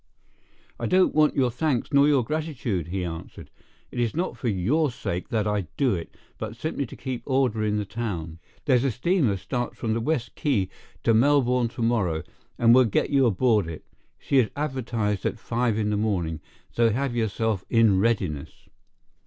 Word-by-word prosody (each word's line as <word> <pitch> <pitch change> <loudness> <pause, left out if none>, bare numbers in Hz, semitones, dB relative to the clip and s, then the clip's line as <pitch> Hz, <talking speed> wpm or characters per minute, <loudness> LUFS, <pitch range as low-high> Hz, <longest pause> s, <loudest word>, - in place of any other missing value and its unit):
"I - - -1
don't 185 0 +3
want 155 -1 +3
your 130 -3 +2
thanks 135 +1 -1
nor 140 +1 +6
your 140 -4 +3
gratitude," 125 - -2
he 90 +1 -3
answered; 80 -1 -8 0.4
"it's 120 0 -1
not 175 +3 -1
for 125 - -4
your 120 - +1
sake 90 -7 -4
that 110 -3 0
I 105 -4 -1
do 135 -4 +2
it, 85 -3 -6 0.2
but 110 0 -5
simply 140 +1 -3
to - - -10
keep 130 -3 -5
order 130 -5 +1
in 105 0 0
the 105 - -2
town. 85 -8 -5 0.3
There's 130 -4 +3
a 135 - +2
steamer 125 - +1
starts 120 +6 -4
from 110 -2 -1
the 115 - -1
West 145 -1 -1
Quay 115 -11 0 0.3
to 115 - +4
Melbourne 125 0 +3
to 120 0 -5
morrow, 100 -9 +1 0.3
and 115 0 +5
we'll 130 0 +6
get 110 - 0
you 135 -3 +4
aboard 110 -2 +2
it. 80 -2 -8 0.3
She 135 - +2
is 115 - +2
advertised 115 -8 -2
at - - -1
five 115 -1 -1
in 105 -1 0
the 105 - 0
morning, 90 -7 -1 0.3
so 115 -1 +3
have 125 +2 -1
yourself 110 -3 -1
in 115 -5 +4
readiness." 95 -9 -1
115 Hz, 180 wpm, -25 LUFS, 105-130 Hz, 0.4 s, nor